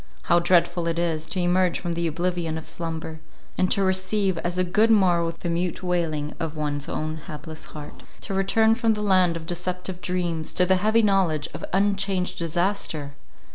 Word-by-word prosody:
How 170 0 +4
dreadful 175 -1 +2
it 165 0 -1
is, 165 -2 -1
to 190 - -2
emerge 180 0 +2
from 175 - -3
the 170 0 -1
oblivion 170 0 -1
of 160 - -8
slumber, 160 -1 -5 0.4
and 185 - +1
to 200 - +3
receive 190 -1 0
as 175 +1 -2
a 185 - +3
good 210 +5 +3
morrow 180 -6 +4
the 165 +1 -6
mute 175 +2 -2
wailing 165 -5 -1
of 160 -2 -3
one's 145 -1 -2
own 155 0 -3
hapless 155 -1 -7
heart 150 -1 -10 0.2
—to - - -5
return 220 +3 +3
from 225 -1 +2
the 210 - -3
land 185 -4 +3
of 160 - -9
deceptive 180 +1 -4
dreams, 175 -3 -2
to 180 - +3
the 190 +1 +3
heavy 220 +4 +3
knowledge 185 -7 +2
of - - -7
unchanged 195 -1 0
disaster! 165 -3 -1
175 Hz, 180 wpm, -24 LUFS, 165-190 Hz, 0.4 s, How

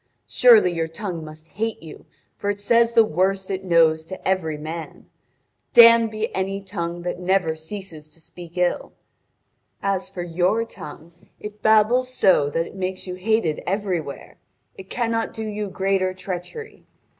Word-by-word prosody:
Surely 225 -7 +5
your 165 -1 -1
tongue 170 -1 -6
must 155 +1 -12
hate 225 -3 -4
you, 160 - -12 0.3
for 205 - -3
it 205 0 -2
says 235 +2 +3
the 230 -1 +6
worst 190 +2 0
it 190 0 -3
knows 160 -3 +3
to 185 - -7
every 170 -5 0
man. 160 +2 -7 0.7
Damned 230 -1 +8
be 215 +1 -4
any 195 +1 -2
tongue 175 -3 -5
that 180 0 -4
never 180 -2 +1
ceases 160 -2 -9
to - - -22
speak 170 +1 -13
ill! 180 0 0 0.9
As 195 -1 -2
for 175 - -6
your 180 +6 0
tongue, 160 -5 -11 0.3
it 210 0 -9
babbles 220 +4 +3
so 185 - +3
that 165 +3 -1
it - - -11
makes 185 -1 -4
you 180 - -5
hated 185 -4 0
everywhere. 185 -7 -3 0.4
It 190 0 -12
cannot 230 -2 -2
do 220 - -4
you 210 -1 -4
greater 190 -1 0
treachery. 185 - -7
190 Hz, 155 wpm, -22 LUFS, 170-210 Hz, 0.9 s, Damned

